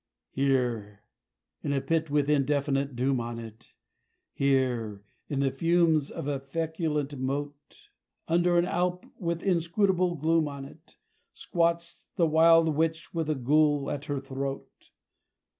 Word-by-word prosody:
Here, 120 -7 -1 0.6
in 140 - -1
a 140 - +1
pit 160 +2 -1
with 145 -1 +1
indefinite 140 -1 +1
doom 130 +1 +1
on 120 0 -5
it, 115 0 -11 0.6
Here, 125 -7 0 0.3
in 140 -2 -1
the 135 -1 +1
fumes 165 0 +2
of - - -6
a 140 -2 -1
feculent 150 -1 -3
moat, 145 +2 -5 0.4
Under 175 +1 +3
an 175 - +3
alp 180 0 -1
with 170 -1 -2
inscrutable 180 0 +1
gloom 160 +1 +2
on 140 -1 -7
it, 155 +4 -16 0.4
Squats 170 -1 -1
the 170 - +3
wild 165 +1 +5
witch 160 0 -1
with 165 -2 -2
a 155 - +1
ghoul 145 +2 +2
at 145 0 -4
her 145 -3 -2
throat! 135 0 -6
145 Hz, 135 wpm, -28 LUFS, 135-165 Hz, 0.6 s, wild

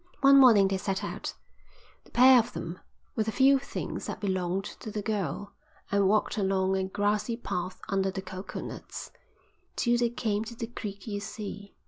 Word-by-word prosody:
One 275 0 +8
morning 225 -7 +7
they 195 0 0
set 190 +1 -2
out, - - -5 0.7
the - - -19
pair 255 +1 +7
of 230 - -2
them, 170 +2 -5 0.4
with 220 -1 0
the - - +1
few 270 +3 +5
things 275 - -5
that - - -5
belonged 185 -1 -1 0.2
to - - -7
the 210 -1 -4
girl, 205 -3 -3 0.4
and 200 -1 +3
walked 215 +2 +2
along 190 -1 +1
a 190 0 0
grassy 205 +4 0
path 180 -5 -4
under 195 -1 +1
the 190 0 -5
coconuts, 185 0 -7 0.6
till 240 -1 +2
they 240 -1 +2
came 220 -3 -1
to 235 +1 -8
the 230 0 -4
creek 205 -4 -7
you 205 -2 -3
see. 205 -1 -7
205 Hz, 175 wpm, -29 LUFS, 190-230 Hz, 0.7 s, One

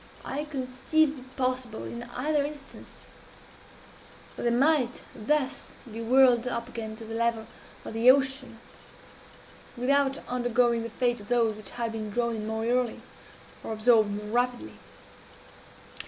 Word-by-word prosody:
I 290 +3 -3
conceived 280 +2 0
it 260 +1 -16
possible, 255 -3 -2
in 235 - -6
either 280 +5 -1
instance, 290 -1 -9 1.3
that - - -7
they 240 - +2
might 255 0 +2
thus 275 +4 -1 0.2
be 225 +2 -6
whirled 250 0 +5
up 235 -1 -2
again 220 -2 -6
to 225 0 -9
the 225 - -7
level 230 -1 0 0.4
of - - -6
the 230 +3 +5
ocean, 265 -2 +3 1.2
without 275 +2 +2
undergoing 245 -1 +2
the 230 - -5
fate 240 +1 0
of 205 - -12
those 230 -2 +2
which 210 -2 -9
had 235 -2 -3
been 215 -1 -4
drawn 235 +2 0
in 215 0 -5
more 220 0 -2
early 245 0 0 0.6
or - - -4
absorbed 220 -1 +4
more 205 +1 -4
rapidly. 245 +1 0
245 Hz, 140 wpm, -28 LUFS, 225-265 Hz, 1.3 s, whirled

